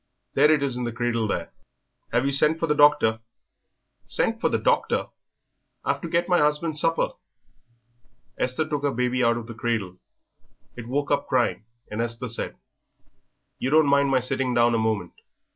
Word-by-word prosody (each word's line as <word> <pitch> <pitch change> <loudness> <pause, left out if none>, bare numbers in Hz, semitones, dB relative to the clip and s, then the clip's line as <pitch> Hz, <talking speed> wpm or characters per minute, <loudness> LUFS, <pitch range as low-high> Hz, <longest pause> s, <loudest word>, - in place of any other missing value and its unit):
There 150 +3 +5
it 150 -2 +2
is 130 -3 -1
in 125 - -3
the 120 - -2
cradle 115 -1 -1
there." - - -3 0.6
"Have 120 +3 +1
you 140 - +1
sent 150 +4 +2
for 165 - +1
the 150 - +1
doctor?" 145 -7 +4 0.8
"Sent - - -1
for - - +2
the - - +1
doctor! - - +1 0.8
I've - - 0
to 170 - -5
get 170 +1 +1
my 180 -1 +3
husband's 150 +1 +1
supper." 165 -1 +1 1.2
Esther 130 +5 -1
took 150 -2 -2
her 145 - +1
baby 125 0 0
out 115 0 +3
of 120 - -6
the 115 - -8
cradle. 110 -6 -3 0.8
It 115 -1 -8
woke 140 +4 -2
up 140 0 +1
crying, 110 -6 0 0.3
and 105 +2 -2
Esther 115 +1 -3
said, 115 - -4 1.0
"You 130 - -1
don't 155 +2 +5
mind 140 0 +3
my 130 -1 +2
sitting 130 0 -1
down 120 0 +4
a 115 - +2
moment. 110 -5 -1
130 Hz, 175 wpm, -24 LUFS, 115-150 Hz, 1.2 s, There